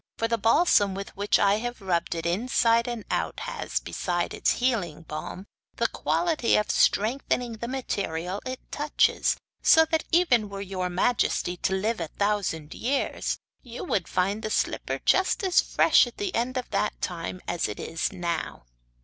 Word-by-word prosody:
'For 230 - 0
the 230 0 0
balsam 225 - +4
with 195 0 -7
which 205 +1 +2
I 200 +1 +3
have 240 +1 -4
rubbed 175 -4 -1
it 165 0 -4
inside 230 +5 +2
and 235 -3 -4
out - - -1
has, - - -3
besides 175 -1 -2
its - - +2
healing 200 - -1
balm, 160 +4 -7 0.3
the - - 0
quality 320 -9 +1
of 210 - +1
strengthening 235 +1 +1
the 235 - -5
material 195 -8 -3
it 255 0 -5
touches, 295 0 +2 0.2
so 320 0 +6
that, 320 0 -1
even 255 - +3
were 200 0 -6
your 185 -2 -3
majesty 180 -1 +1
to 190 - -1
live 215 +3 -1
a 165 - -3
thousand 195 -5 -1
years, 270 +4 -1 0.2
you 240 -1 -8
would 190 - -1
find 195 +4 0
the 215 - -3
slipper - - -1
just 375 +3 +3
as 370 -2 +4
fresh - - +4
at 240 - -11
the 400 -2 -3
end 250 +3 -1
of 250 - -4
that - - -1
time 175 +1 -4
as 175 - 0
it 105 - -6
is 165 0 -2
now. 170 -2 -3
210 Hz, 170 wpm, -26 LUFS, 180-250 Hz, 0.3 s, so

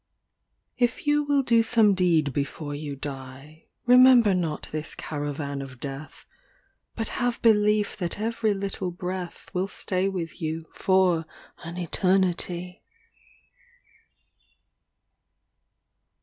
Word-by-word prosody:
XL - - -56
VII 250 - -11
If 240 - -6
you 295 0 +3
will 285 -1 +2
do 230 -2 +4
some 225 -2 +4
deed 165 -6 +2
before 145 +2 -3
you 145 -1 -5
die, 135 +2 -9 0.2
Remember 250 -4 +7
not 165 -4 -2
this 155 0 -3
caravan 145 -1 -4
of 130 -2 -10
death, 140 +3 -8 0.7
But 225 -1 -3
have 245 -1 0
belief 210 -2 +3
that 175 -1 -3
every 220 -1 0
little 195 -2 -3
breath 180 0 -6
Will 185 +1 0
stay 190 -1 -1
with 175 -4 -5
you 160 0 -2
for 185 -4 +2 0.4
an 170 +1 -7
eternity. 180 0 0
180 Hz, 115 wpm, -26 LUFS, 155-210 Hz, 0.7 s, Remember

